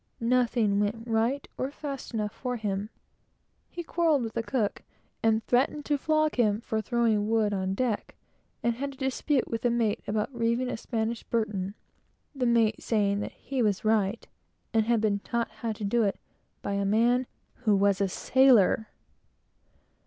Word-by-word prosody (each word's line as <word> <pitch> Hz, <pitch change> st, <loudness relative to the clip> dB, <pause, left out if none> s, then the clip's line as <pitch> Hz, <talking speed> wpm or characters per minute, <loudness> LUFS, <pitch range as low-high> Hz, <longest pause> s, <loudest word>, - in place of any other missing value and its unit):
Nothing 230 Hz, -4 st, +2 dB
went 210 Hz, +2 st, -1 dB
right, 235 Hz, +4 st, 0 dB
or 260 Hz, -, -1 dB
fast 280 Hz, -2 st, -6 dB
enough 215 Hz, -3 st, -2 dB
for 250 Hz, -1 st, -3 dB
him. 205 Hz, -2 st, -3 dB, 0.8 s
He 345 Hz, -, -6 dB
quarrelled 320 Hz, -5 st, +2 dB
with 225 Hz, -1 st, -4 dB
the 230 Hz, -, -1 dB
cook, 225 Hz, -3 st, -1 dB, 0.4 s
and 225 Hz, 0 st, +2 dB
threatened 275 Hz, +4 st, +1 dB
to 290 Hz, -, +1 dB
flog 310 Hz, 0 st, +1 dB
him 215 Hz, -3 st, +3 dB
for 220 Hz, -1 st, -2 dB
throwing 220 Hz, -2 st, +1 dB
wood 220 Hz, -2 st, +2 dB
on 190 Hz, -1 st, -1 dB
deck; 235 Hz, -2 st, -2 dB, 0.5 s
and 235 Hz, -, +2 dB
had 275 Hz, +3 st, -5 dB
a -, -, -22 dB
dispute 265 Hz, 0 st, 0 dB
with 230 Hz, 0 st, -3 dB
the 245 Hz, -, +2 dB
mate 230 Hz, -3 st, 0 dB
about 210 Hz, +5 st, -1 dB
reeving 235 Hz, +1 st, 0 dB
a -, -, -3 dB
Spanish 225 Hz, 0 st, -2 dB
burton; 205 Hz, -4 st, -2 dB, 0.6 s
the 260 Hz, -3 st, 0 dB
mate 225 Hz, -2 st, +2 dB
saying 205 Hz, -3 st, +1 dB
that -, -, -5 dB
he 270 Hz, -2 st, -3 dB
was 210 Hz, -2 st, +1 dB
right, 215 Hz, 0 st, +1 dB, 0.5 s
and 220 Hz, -1 st, +2 dB
had 235 Hz, -2 st, +3 dB
been 205 Hz, -2 st, +1 dB
taught 235 Hz, +2 st, -2 dB
how 230 Hz, -, -4 dB
to 215 Hz, 0 st, -6 dB
do 230 Hz, +4 st, +2 dB
it 200 Hz, -3 st, 0 dB, 0.4 s
by 200 Hz, -, -2 dB
a 200 Hz, 0 st, 0 dB
man 235 Hz, +5 st, +2 dB, 0.4 s
who 210 Hz, -2 st, +5 dB
was 200 Hz, 0 st, +2 dB
a 195 Hz, -, +3 dB
sailor! 240 Hz, -2 st, +4 dB
225 Hz, 170 wpm, -28 LUFS, 210-250 Hz, 0.8 s, who